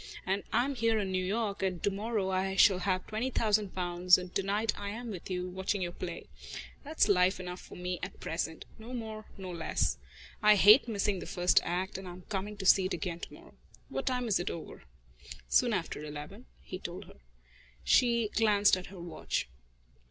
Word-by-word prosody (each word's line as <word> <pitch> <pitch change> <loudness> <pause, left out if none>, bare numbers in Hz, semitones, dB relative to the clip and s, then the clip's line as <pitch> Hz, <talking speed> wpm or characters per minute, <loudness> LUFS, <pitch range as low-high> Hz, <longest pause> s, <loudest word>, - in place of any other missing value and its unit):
And 195 +1 0
I 245 - +3
am 280 - -2
here 230 -3 +1
in 195 -3 -1
New 185 0 0
York, 205 +1 -1
and 185 -3 -1
to 205 - +2
morrow 205 -1 -1
I 190 +1 0
shall 195 -1 +6
have 185 -1 0
twenty 220 +4 -2
thousand 210 -5 +1
pounds, 180 0 +4
and 180 -1 -7
to - - +1
night 205 +2 0
I 205 0 -5
am 230 +2 -5
with 185 -2 -7
you, 180 -1 -2
watching 190 +1 -2
your 175 - -3
play. 175 -1 -6 0.6
That's 305 -5 +2
life 185 -2 +3
enough 180 0 -6
for - - -12
me 180 0 -3
at 185 - -6
present 160 0 -3
no 235 +3 -7
more, 220 -2 -6
no 190 -2 -6
less. 170 -2 -1 0.4
I 210 -1 +7
hate 210 +6 +7
missing 205 -3 0
the - - -7
first 180 0 +3
act, 185 +3 -2
and 190 - -9
I'm 180 +1 -9
coming 205 +1 -3
to 195 - -6
see 190 0 +6
it 185 - -1
again 170 0 -4
to - - -8
morrow. - - -14 0.4
What - - -4
time 250 -2 0
is 210 - +2
it 175 - -2
over?" 160 - -8 0.6
"Soon - - +3
after 150 - -2
eleven," 150 +10 -8 0.2
he 185 - -7
told 180 +2 -7
her. - - -16 0.7
She 235 -3 +3
glanced 210 -2 +4
at 185 -1 -7
her 190 -1 -11
watch. 170 - -3
190 Hz, 205 wpm, -31 LUFS, 180-215 Hz, 0.7 s, I